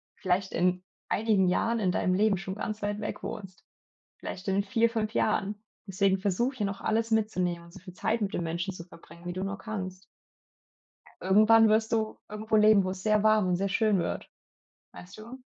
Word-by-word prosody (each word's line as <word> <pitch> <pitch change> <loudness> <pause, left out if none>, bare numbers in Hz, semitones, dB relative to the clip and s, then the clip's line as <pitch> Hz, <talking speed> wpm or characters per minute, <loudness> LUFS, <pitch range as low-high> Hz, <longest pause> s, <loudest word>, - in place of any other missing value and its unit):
vielleicht 190 0 -1
in 180 +1 +1 0.3
einigen 205 -4 +2
Jahren 230 +5 +1
in 185 -3 +1
deinem 185 - +1
Leben 205 0 +2
schon 190 +1 -6
ganz 215 0 -5
weit 205 0 -2
weg 210 - -5
wohnst. 195 -4 -7 0.6
Vielleicht 185 +2 -7
in 200 +1 +1
4, 225 +3 +2
5 220 -1 -2
Jahren. 210 0 0 0.2
Deswegen 195 0 +1
versuch 215 +7 0
hier 210 -5 -2
noch 195 - -5
alles 225 +1 0
mitzunehmen 180 -6 0
und 170 - -16
so - - -11
viel 185 0 -12
Zeit 220 +3 -1
mit 195 - -2
den 175 - -1
Menschen 170 +3 -3
zu 170 - -8
verbringen, 170 -1 -16
wie 175 - -3
du 185 +2 -4
nur 195 0 -4
kannst. 190 -3 -6 1.2
Irgendwann 215 +4 +6
wirst 220 +1 +2
du 220 -1 -1
irgendwo 215 +1 -1
leben, 210 -1 +6
wo 185 - -2
es 185 +1 -7
sehr 215 -1 +3
warm 215 -3 +4
und 180 - +2
sehr 195 +2 -1
schön 205 -1 +2
wird. - - -4 0.6
Weißt 180 +2 -12
du? 240 +4 -11
200 Hz, 195 wpm, -28 LUFS, 185-215 Hz, 1.2 s, Irgendwann